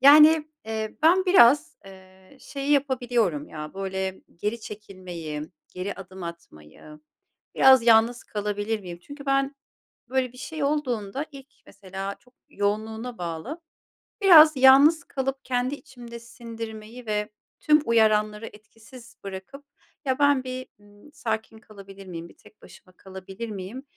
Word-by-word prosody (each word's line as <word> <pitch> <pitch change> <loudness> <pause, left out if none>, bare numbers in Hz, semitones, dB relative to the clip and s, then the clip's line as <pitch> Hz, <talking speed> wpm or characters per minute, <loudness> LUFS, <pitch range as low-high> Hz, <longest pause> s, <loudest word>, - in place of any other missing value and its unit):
Yani, 305 +3 +7 0.2
eee, 220 -1 -4
ben 355 +4 +5
biraz, 295 -4 +5
eee, 190 +4 -16
şeyi 275 0 -5
yapabiliyorum 245 - 0
ya, 150 +1 -8
böyle 190 -1 -4 0.2
geri 210 +6 -3
çekilmeyi, 185 -8 -8 0.3
geri 185 +2 -5
adım 190 -1 -11
atmayı, 150 - -11 0.6
"Biraz 265 -2 +7
yalnız 230 +1 +4
kalabilir 210 +1 -3
miyim?" 175 -3 -9
Çünkü 285 +6 -11
ben 275 +1 +1 0.5
böyle 255 -1 -1
bir - - -15
şey 310 +3 -5
olduğunda 270 -4 -2
ilk 275 -2 -12 0.2
mesela, 195 0 -7
çok 250 +1 -27 0.2
yoğunluğuna 220 +4 -3
bağlı, 175 - -6 0.6
biraz 320 -6 +8
yalnız 275 +5 +7
kalıp 270 0 -4
kendi 250 +2 -1
içimde 245 -6 -12
sindirmeyi 230 0 -9
ve 210 -1 -2 0.3
tüm 300 0 +4
uyaranları 215 -1 +2
etkisiz 225 +3 -15
bırakıp 195 +9 -9 0.4
"Ya, 260 0 0
ben 285 -2 +4
bir, 255 0 -6
ımm, 205 +7 -19
sakin 225 -6 -4
kalabilir 195 -2 -13
miyim, 170 -1 -8
bir - - -20
tek - - -21
başıma 185 - -17
kalabilir 190 +3 -9
miyim?" 205 +6 -7
225 Hz, 130 wpm, -25 LUFS, 195-265 Hz, 0.6 s, biraz